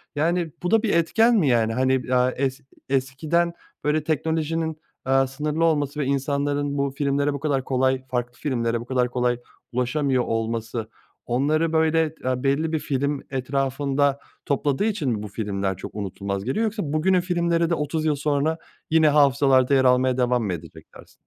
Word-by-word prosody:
Yani, 165 +2 0
bu 180 - -1
da 225 0 +4
bir 225 - +1
etken 225 +8 +3
mi 185 -9 +3
yani? 115 -2 +2
Hani, 130 +2 +2
eee, 125 -1 +1
es 135 0 -1 0.3
eskiden, 145 +6 0 0.3
böyle, 150 +1 +1
teknolojinin, 160 +1 -1 0.3
eee, 135 0 +3
sınırlı 150 +4 -1
olması 150 -2 0
ve 145 - 0
insanların 140 +1 -1
bu 140 0 0
filmlere 140 +1 0
bu 140 - -4
kadar 140 -3 0
kolay, 130 0 +1
farklı 120 -1 -2
filmlere 120 -4 -1
bu 120 - -8
kadar 125 -1 0
kolay 125 0 0 0.3
ulaşamıyor 125 +1 0
olması 115 0 -3 0.4
onları, 155 +6 +1
böyle, 160 0 +3 0.2
eee, 130 0 -1
belli 145 +4 +1
bir 160 - 0
film 140 0 -1
etrafında 135 +1 0 0.3
topladığı 140 +5 0
için 200 -11 -1
mi 110 -3 -2
bu - - -5
filmler 100 -3 -3
çok - - -9
unutulmaz 100 -1 -4
geliyor 130 - -1
yoksa 215 -1 -1
bugünün 180 +4 +3
filmleri 170 -2 +1
de 170 - +2
otuz 155 +1 -2
yıl 155 -2 +2
sonra 145 +2 0 0.3
yine 160 -1 +4
hafızalarda 140 -2 +4
yer 135 -1 +4
almaya 125 0 +3
devam 125 -1 +1
mı 100 -4 -1
edecek 85 -1 -9
dersin? - - -15
140 Hz, 170 wpm, -24 LUFS, 125-155 Hz, 0.4 s, da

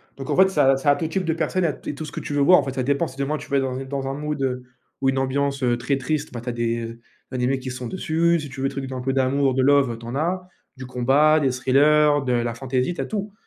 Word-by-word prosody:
Donc 135 - -8
en - - 0
fait 190 - +7
ça 135 -8 +3
ça 145 +2 +3
a 145 - +3
tout 160 +2 -2
type 190 +1 -2
de 165 - +1
personne 170 +2 0
et - - +3
a 150 - -3
et 150 - -4
tout 155 - -6
ce - - -10
que - - -4
tu - - -5
veux 145 - +1
voir 180 +6 +7
en - - 0
fait. 135 - -4
Ça 130 - -1
dépend, 140 +5 +1
si 130 - -13
demain 145 +2 -1
tu - - -11
vas 140 - +2
être 135 - +1
dans 130 -1 -3
une 135 0 -6
dans 135 -1 -3
un 135 - -2
mood 150 0 -4
heu, 125 -1 -1 0.4
ou 135 - +3
une 135 - 0
ambiance, 140 +1 -1
heu, 120 -1 +2
très 130 +3 -1
triste, 145 +3 -2
bah, 120 - -5
tu 120 - -16
as - - 0
des 115 0 -2 0.3
animés 130 +1 0
qui 130 - -6
sont 125 -1 -6
dessus, 170 0 +1
si 150 - -6
tu 130 0 -8
veux 135 - +1
des - - -11
trucs 135 -1 -4
d'un 130 -1 -5
peu 135 - -1
d'amour, 135 0 +2
de 130 - +1
love, 135 -3 +3
tu 115 - -11
en 120 +3 -5
as, 180 +4 -1 0.3
du 130 - -7
combat, 135 +5 +3
des 135 - +2
thrillers, 145 +3 +3
de 125 - 0
la 120 -1 0
fantaisie, 130 +5 -1
tu - - -4
as - - -2
tout. 205 -1 -4
135 Hz, 315 wpm, -23 LUFS, 130-150 Hz, 0.4 s, fait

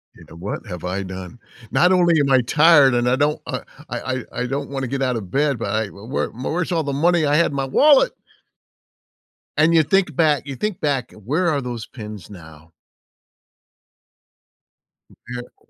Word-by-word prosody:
You - - -16
know, 80 - -13
"What 95 +7 -6
have 90 -3 -7
I 95 +2 -3
done? 95 +4 -8 0.3
Not 180 +1 +4
only 175 -3 +4
am 140 -1 +1
I 130 - +5
tired 145 +1 +5
and 120 0 +1
I 125 - +3
don't 150 +2 +1
I - - -4 0.3
I 130 - -3
I 130 - -4 0.2
I 125 - -1
don't 140 +2 -3
wanna 135 -2 -3
get 135 +2 -3
out 125 -2 0
of 105 -5 -5
bed, 140 +1 0
but 100 - -3
I 110 +1 0
w 100 +2 -13
where 130 - -2
where's 165 +9 -3
all 165 -2 +1
the 140 -1 -3
money 170 +2 +2
I 145 0 +2
had 170 - +4
in 140 - -6
my 135 - -1
wallet?" 285 - +5 1.5
And 160 +2 +4
you 160 -1 +5
think 180 0 +1
back 150 -3 +2
you 140 -1 -6
think 210 +4 -3
back, 140 -5 -1
where 150 - -1
are 145 -3 0
those 120 -2 -5
pins 105 -6 -10
now? 80 -4 -14 2.4
Mm - - -20 0.2
yeah. 120 0 -11
135 Hz, 195 wpm, -21 LUFS, 110-155 Hz, 2.4 s, I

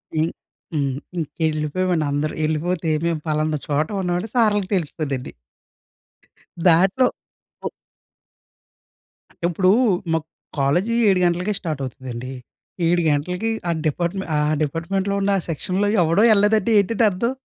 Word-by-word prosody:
హ్మ్, 160 +2 +1 0.4
హ్మ్. 140 -4 0 0.3
ఇంకెళ్ళిపోయామండి 160 +2 -1
అందరూ. 145 +2 -1
ఎళ్ళిపోతే 160 +2 -1 0.2
మేం 170 -1 +1
పలానా 155 0 0
చోట 150 +1 +1
ఉన్నమని 180 +3 -1
సార్‌లుకి 205 -5 +2
తెలిసిపోద్దండి. 145 -6 -3 1.3
దాంట్లో 185 +9 +5 0.6
ఓ - - 0 1.6
అంటే - - -24
ఇప్పుడూ, 185 +2 +3 0.4
మా 165 - +3 0.4
కాలేజీ 175 +12 +1
7:00 190 -2 +4
గంటలకే 180 +4 +1
స్టార్ట్ 155 -6 -4
అవుతదండి. 130 0 -7 0.6
7:00 175 +1 +3
గంటలకి, 180 +9 0 0.2
ఆ - - +3 0.2
డిపార్ట్మెంట్ 175 +4 -2
ఆ - - +2 0.2
డిపార్ట్మెంట్‌లో 190 +6 -1
ఉన్న 200 0 +2 0.2
సెక్షన్‌లో 185 +6 0
ఎవడూ 170 +5 +3
ఎళ్ళలేదంటే 210 +1 +3
ఏంటండి 225 +3 +2
అర్థం? 235 +7 -1
170 Hz, 115 wpm, -22 LUFS, 155-195 Hz, 1.6 s, దాంట్లో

